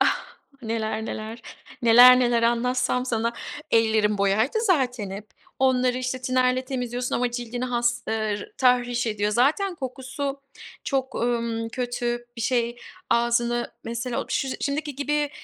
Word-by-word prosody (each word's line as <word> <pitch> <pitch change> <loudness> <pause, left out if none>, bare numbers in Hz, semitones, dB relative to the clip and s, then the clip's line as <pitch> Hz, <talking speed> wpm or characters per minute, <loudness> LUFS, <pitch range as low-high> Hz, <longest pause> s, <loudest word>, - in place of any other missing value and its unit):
Ah! - - +2 0.4
Neler, 220 -1 -2
neler; 220 +2 -6 0.4
neler, 245 +2 +8
neler 240 -1 +2
anlatsam 250 +2 +1
sana. 230 -1 0 0.4
Ellerim 220 -2 +3
boyaydı 210 - +2
zaten 255 - +1
hep. 205 +2 -8 0.3
Onları, 255 -1 +2
işte, 255 0 -3
tinerle 255 0 +1
temizliyorsun 250 -1 -3
ama 245 0 0
cildini 240 0 -4
has, 240 -1 0
ııı, 220 - 0 0.2
r - - -10
tahriş 245 -1 +2
ediyor. 210 -1 0
Zaten 310 - +2
kokusu 270 0 -5 0.4
çok, 265 -2 -1
ımm, 235 -1 -1
kötü 240 0 -3
bir 230 - -6
şey. 240 0 0 0.3
Ağzını, 235 0 +1
mesela 235 +1 -3
o - - -21
ş 270 - -1
şimdiki 290 0 -2
gibi, 295 +1 0
245 Hz, 135 wpm, -25 LUFS, 230-255 Hz, 0.4 s, neler